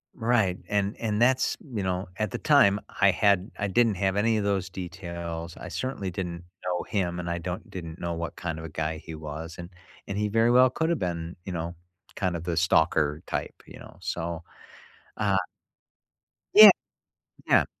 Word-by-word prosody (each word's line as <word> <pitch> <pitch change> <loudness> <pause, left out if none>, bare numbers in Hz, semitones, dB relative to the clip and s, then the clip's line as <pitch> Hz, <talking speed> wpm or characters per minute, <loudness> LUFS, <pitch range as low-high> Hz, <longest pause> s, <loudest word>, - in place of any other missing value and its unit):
Right, 110 -6 +2
and 100 0 0
and 110 -1 -1
that's, 130 +2 +3 0.2
you 105 -3 -1
know 95 +1 -2
at 105 -2 -1
the - - -3
time, 125 -9 +5 0.2
I 100 -1 +7
had 100 +1 +2
I 100 - 0
didn't 110 +2 +3
have 95 0 0
any 110 +2 +2
of 105 - 0
those 100 -2 0
details. 85 -2 -6
I - - -8
certainly 130 -7 -3
didn't 85 -1 -5 0.2
know 90 -1 -1
him, 90 -4 -2
and 85 0 -4
I 85 - -1
don't 90 +2 -5
didn't 85 -2 -7
know 85 0 -2
what 85 0 -4
kind 80 -2 -4
of 80 - -7
a - - -6
guy 80 +1 -3
he 80 +1 -9
was. 80 +2 -7
And 85 0 -8 0.4
and 100 - -3
he 105 0 +1
very 115 +3 +3
well 130 +1 +6
could 160 +6 -1
have 170 -4 +1
been, 85 -1 -3
you 95 - -5
know, 85 0 -4 0.4
kind 95 -3 -1
of 85 - -5
the 85 -2 -2
stalker 75 -3 +2
type, - - -3
you - - -12
know? - - -13
So, 85 0 -3 0.7
uh 100 -2 +1 1.2
Yeah. - - +12 0.8
Yeah. - - +5
90 Hz, 190 wpm, -27 LUFS, 85-105 Hz, 1.2 s, Yeah